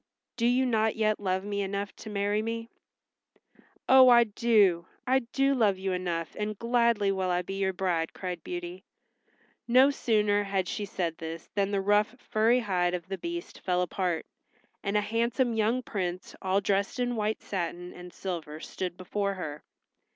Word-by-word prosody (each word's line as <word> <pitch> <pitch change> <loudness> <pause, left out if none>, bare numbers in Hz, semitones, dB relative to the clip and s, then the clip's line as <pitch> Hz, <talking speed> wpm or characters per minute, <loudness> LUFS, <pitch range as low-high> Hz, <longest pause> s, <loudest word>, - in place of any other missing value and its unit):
Do 235 0 +1
you 255 +2 +3
not 220 -3 +1
yet 215 -1 +1
love 190 -1 -1
me 200 0 -2
enough 200 +1 -3
to - - -9
marry 205 +1 0
me?" 230 +1 -4 1.2
"Oh, 260 -1 +8
I 240 -1 +8
do! 205 -6 +3 0.2
I 260 +1 +3
do 270 +3 +1
love 215 -7 +2
you 190 0 -2
enough, 175 -3 -3
and 210 0 -2
gladly 235 -3 +2
will 190 -1 -1
I 180 0 +1
be 195 - -6
your 190 -1 +1
bride," 180 -3 -1
cried 180 -3 -6
Beauty. 175 +1 -6 0.8
No 255 +4 +6
sooner 210 -6 +2
had 195 -2 -1
she 205 - -3
said 175 -4 -3
this 165 0 -7
than 200 -1 +1
the 200 -1 0
rough 205 +4 +2
furry 230 +1 +2
hide 180 -4 +1
of 175 0 -7
the 195 - -3
Beast 345 0 -6
fell 180 -1 +1
apart, 180 -2 -2 0.6
and 200 +1 0
a - - +3
handsome 235 +3 0
young 225 +3 +1
prince 185 -5 -4
all 190 +1 +1
dressed 200 +4 0
in 245 -1 0
white 215 0 -1
satin 175 -1 -4
and 180 0 -10
silver 165 -6 -5
stood 180 +1 -5
before 200 +2 -2
her. 150 -5 -6
200 Hz, 175 wpm, -28 LUFS, 180-230 Hz, 1.2 s, Oh